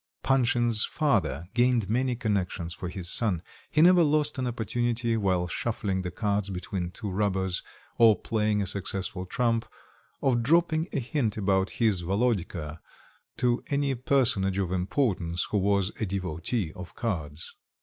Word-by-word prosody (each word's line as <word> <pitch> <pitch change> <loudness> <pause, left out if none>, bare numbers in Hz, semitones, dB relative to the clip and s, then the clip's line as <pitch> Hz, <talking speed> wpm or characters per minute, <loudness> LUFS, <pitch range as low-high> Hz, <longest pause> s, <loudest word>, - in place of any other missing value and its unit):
Panshin's 120 -4 +3
father 95 - 0
gained 120 -4 +2
many 125 +4 +1
connections 95 -7 -2
for 90 - -6
his 90 -1 -5
son. 90 -4 +2 0.3
He 155 -1 +4
never 180 0 +7
lost 150 -2 +2
an 130 - -1
opportunity, 120 0 -1
while 95 -5 +1
shuffling 100 -1 -2
the 90 - -3
cards 105 -1 -1
between 90 -1 -4
two 100 +2 -6
rubbers, 95 -2 0 0.4
or 115 -3 +7
playing 105 -2 0
a - - -2
successful 95 -1 -3
trump, 115 +1 0 0.5
of 125 -3 +2
dropping 160 +4 +2
a - - -1
hint 125 -4 -1
about 95 -2 +1
his 110 -6 +2
Volodka 90 -5 -1 0.6
to 120 -1 +1
any 140 -1 0
personage 120 -7 +1
of 95 -3 -1
importance 90 -3 0
who 105 - +2
was 100 0 +1
a 110 - -1
devotee 95 0 -2
of 90 -1 -10
cards. 80 -9 -3
105 Hz, 145 wpm, -27 LUFS, 95-120 Hz, 0.6 s, never